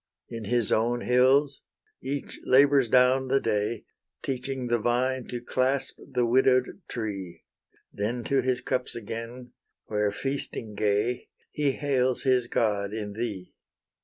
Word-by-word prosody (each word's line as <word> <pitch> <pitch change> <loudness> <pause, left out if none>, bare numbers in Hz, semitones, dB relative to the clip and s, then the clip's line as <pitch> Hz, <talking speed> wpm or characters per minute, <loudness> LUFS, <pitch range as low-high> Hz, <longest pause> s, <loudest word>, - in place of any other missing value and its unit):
In 115 -2 -6
his 120 0 +1
own 120 +2 +1
hills 135 +3 +3 0.4
each 140 +2 -5
labours 135 -1 +5
down 130 +2 +4
the 135 +1 +3
day, 110 -1 -1 0.4
Teaching 130 0 -3
the 120 -1 +1
vine 125 +2 0
to 120 - -4
clasp 130 +3 -1
the 125 -2 +1
widow'd 130 +6 +2
tree: 100 -7 -5 0.5
Then 115 +4 -2
to 135 +2 +1
his 125 -1 0
cups 125 0 -2
again, 115 +2 -7 0.3
where, 105 -1 0
feasting 135 -3 -4
gay, 105 +4 0 0.2
He 145 -2 0
hails 130 -3 0
his 130 -3 +2
god 105 -3 0
in 105 -2 -4
thee. 105 -5 -5
125 Hz, 130 wpm, -27 LUFS, 110-130 Hz, 0.5 s, labours